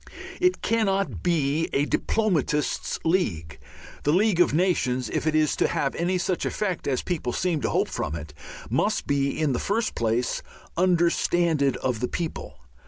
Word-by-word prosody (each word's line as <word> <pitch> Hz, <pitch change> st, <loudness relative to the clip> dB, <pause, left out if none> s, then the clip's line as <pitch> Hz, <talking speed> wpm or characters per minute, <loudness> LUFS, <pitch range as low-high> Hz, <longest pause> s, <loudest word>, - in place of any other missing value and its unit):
It 365 Hz, 0 st, +2 dB
cannot 195 Hz, -4 st, 0 dB
be 160 Hz, -2 st, +1 dB
a 140 Hz, -, +2 dB
diplomatist's 155 Hz, -, 0 dB
league. 95 Hz, -, 0 dB, 0.4 s
The 145 Hz, -, +1 dB
League 195 Hz, +1 st, +3 dB
of 175 Hz, -, +5 dB
Nations, 135 Hz, -7 st, +1 dB
if -, -, -1 dB
it 155 Hz, -, +2 dB
is 155 Hz, -1 st, +3 dB
to -, -, +3 dB
have 135 Hz, -, -1 dB
any 180 Hz, +2 st, 0 dB
such 180 Hz, 0 st, -1 dB
effect 190 Hz, -5 st, -2 dB
as 130 Hz, -3 st, 0 dB
people 155 Hz, -9 st, -2 dB
seem 170 Hz, -4 st, 0 dB
to -, -, 0 dB
hope -, -, +1 dB
from 75 Hz, -, -3 dB
it, 75 Hz, -2 st, -8 dB, 0.3 s
must -, -, 0 dB
be, 140 Hz, 0 st, 0 dB
in 150 Hz, -4 st, +1 dB
the 120 Hz, -, -1 dB
first 220 Hz, +3 st, -1 dB
place, 115 Hz, +1 st, 0 dB, 0.3 s
"understanded 170 Hz, -4 st, +2 dB
of 125 Hz, -4 st, -2 dB
the 125 Hz, -, -1 dB
people." 165 Hz, +3 st, -5 dB
160 Hz, 165 wpm, -25 LUFS, 135-180 Hz, 0.4 s, of